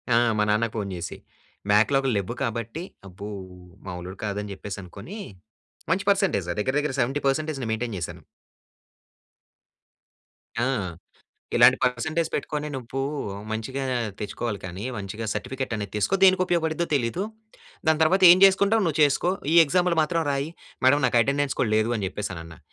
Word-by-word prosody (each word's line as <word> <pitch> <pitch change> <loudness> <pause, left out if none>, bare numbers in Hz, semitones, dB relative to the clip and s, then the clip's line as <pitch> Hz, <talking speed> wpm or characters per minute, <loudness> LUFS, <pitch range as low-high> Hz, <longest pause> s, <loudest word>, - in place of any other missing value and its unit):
ఆ! - - +5 0.2
మా 105 - +3
నాన్నకి 110 +2 +1
ఫోన్ 105 -3 -2
చేసి. 85 -1 -6 0.5
బాక్‌లాగ్‌లు 135 +6 +3
లెవ్వు 100 +4 -3
కాబట్టి, 115 +7 -3 0.2
అబ్బో! 100 +3 -8 0.6
మామూలోడు 90 +1 -7
కాదని 105 0 -3
చెప్పేసనుకోని 100 - -8 0.7
మంచి 190 +3 +1
పర్సెంటేజ్ 190 - +1
దగ్గర, 130 +5 0
దగ్గర 150 -2 -2
70%ని 135 +1 -1
మైంటైన్ 110 0 -2
చేశాను. 85 - -6 2.4
ఆ! - - +1 0.9
"ఇలాంటి 120 +2 +7
పర్సెంటేజ్ 155 +7 0
పెట్టుకొని 150 0 -2
నువ్వు 130 +1 -5 0.5
మంచిగా 120 +5 -3 0.4
తెచ్చుకోవాలి 105 +1 -3
కానీ, 90 +4 -6
మంచిగా 100 +3 -5
సర్టిఫికెట్ 125 +3 -3
అనేది 100 -2 -5
తీసుకో 105 - +1
దేనికి 185 -1 +6
ఉపయోగపడుద్దో 170 -1 0
తెలీదు. 135 +6 0 0.6
దాని 160 0 +3
తర్వాత 190 +5 +3
ఏం 180 - +8
చేసుకుంటావో 200 +3 +4
నువ్వు 160 -2 -1
చేసుకో. 145 +4 +3 0.2
ఈ - - +3
ఎగ్జాములు 175 +2 +1
మాత్రం 165 +2 0
రాయి." 140 +2 -1 0.3
మేడం 140 +3 +5
నాకు 120 -1 +3
అటెండెన్స్ 140 +2 0
కూడా 110 - +1
లేదు 110 +2 +1
అని 100 -3 -2
చెప్పేసని 95 -3 -5
అన్నా. 80 -1 -12
125 Hz, 135 wpm, -25 LUFS, 105-155 Hz, 2.4 s, ఏం